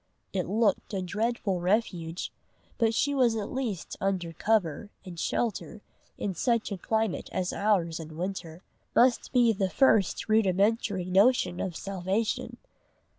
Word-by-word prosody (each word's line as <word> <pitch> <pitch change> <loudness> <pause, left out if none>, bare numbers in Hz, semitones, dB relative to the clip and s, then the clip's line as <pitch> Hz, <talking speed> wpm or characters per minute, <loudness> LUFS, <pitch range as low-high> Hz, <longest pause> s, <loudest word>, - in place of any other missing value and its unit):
It 185 -2 -1
looked 210 0 +1
a 190 - -1
dreadful 205 0 -1
refuge, 180 -3 -1 0.5
but 225 -1 +2
she 285 +5 +1
was 250 -5 +3
at 210 -2 -3
least 240 -9 -4
under 185 -4 -1
cover, 205 -2 0 0.2
and 175 -3 -8
shelter, 215 0 -2 0.3
in 195 - -2
such 230 +5 0
a 200 - -2
climate 220 0 -1
as 185 -1 -2
ours 180 -6 +1
in 160 -1 -9
winter, 175 -2 -5 0.3
must 245 0 +3
be 240 -3 +4
the 195 -2 0
first 215 -5 +3
rudimentary 205 -2 +2
notion 195 +1 +3
of 180 -3 -3
salvation. 195 +4 -2
200 Hz, 135 wpm, -28 LUFS, 180-225 Hz, 0.5 s, be